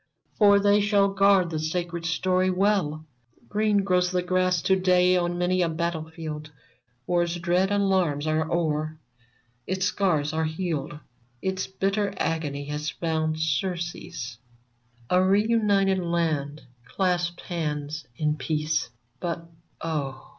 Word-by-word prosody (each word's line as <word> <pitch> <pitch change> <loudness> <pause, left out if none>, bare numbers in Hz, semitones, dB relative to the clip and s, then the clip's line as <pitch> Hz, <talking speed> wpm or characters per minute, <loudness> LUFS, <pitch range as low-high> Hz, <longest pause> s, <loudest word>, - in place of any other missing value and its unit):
For 200 -2 +7
they 205 +1 +4
shall 200 -1 +3
guard 195 -2 +4
the 155 - -2
sacred 170 +1 -2
story 185 +2 +1
well! 185 -5 +1 0.4
Green 210 -1 +2
grows 180 -2 +2
the 180 -1 0
grass 185 0 +2
to 190 - +4
day 180 -1 +4
on 175 -1 0
many 180 +1 +1
a 170 - +2
battle 160 -1 -2
field; 155 -2 -7 0.6
War's 175 +1 +1
dread 175 +2 +1
alarms 190 -7 +1
are 160 +1 0
o'er; 155 -2 -1 0.7
its 190 0 0
scars 155 -8 +1
are 160 0 0
healed; 160 -2 -3 0.4
Its 190 +4 -2
bitter 195 +1 -1
agony 145 -3 -2
has 150 +1 -3
found 155 0 -1
surcease; 170 -5 -3 0.7
A 180 +1 +5
re 200 +3 +3
united 200 -4 +3
land 160 -4 -1 0.2
clasps 175 +4 -1
hands 150 -3 -4
in 150 +2 0
peace. 150 +2 -1 0.3
But, 170 +1 -4 0.3
oh 145 -5 -4
175 Hz, 130 wpm, -26 LUFS, 155-185 Hz, 0.7 s, For